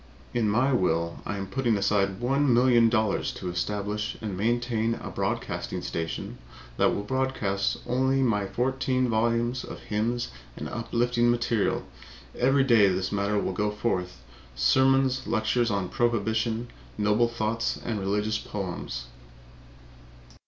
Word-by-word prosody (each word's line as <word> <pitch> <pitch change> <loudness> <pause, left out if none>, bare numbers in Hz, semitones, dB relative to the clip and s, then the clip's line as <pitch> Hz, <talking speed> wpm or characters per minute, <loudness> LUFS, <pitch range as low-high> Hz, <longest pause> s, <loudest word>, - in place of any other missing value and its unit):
In 115 -3 +1
my 125 +6 +2
will 85 -6 0
I 100 - -2
am 100 - -3
putting 115 +2 0
aside 100 -1 +1
one 135 +3 +2
million 120 -1 +5
dollars 110 -3 +1
to 90 - -5
establish 105 +4 -2
and 105 -4 -4
maintain 115 +2 0
a - - -7
broadcasting - - -3
station 80 -1 -4 0.4
that - - +4
will 100 - -3
broadcast 105 -5 -1
only 130 +2 +2
my 105 -5 +1
fourteen 130 +2 0
volumes 115 +2 +1
of - - -8
hymns 115 - -1 0.3
and - - -5
uplifting 120 +1 0
material. 120 -3 +1 0.5
Every 135 +2 +3
day 115 -6 +5
this 95 0 0
matter 100 +1 0
will 95 - -1
go 105 +3 0
forth 100 -4 -2 0.3
sermons, 130 - +3
lectures 115 +1 +1
on 100 -3 -1
prohibition, 115 +1 0 0.3
noble 105 +3 +3
thoughts 115 0 -1
and 110 -3 -2
religious 105 +3 0
poems." 90 -11 -5
110 Hz, 130 wpm, -27 LUFS, 100-120 Hz, 0.5 s, million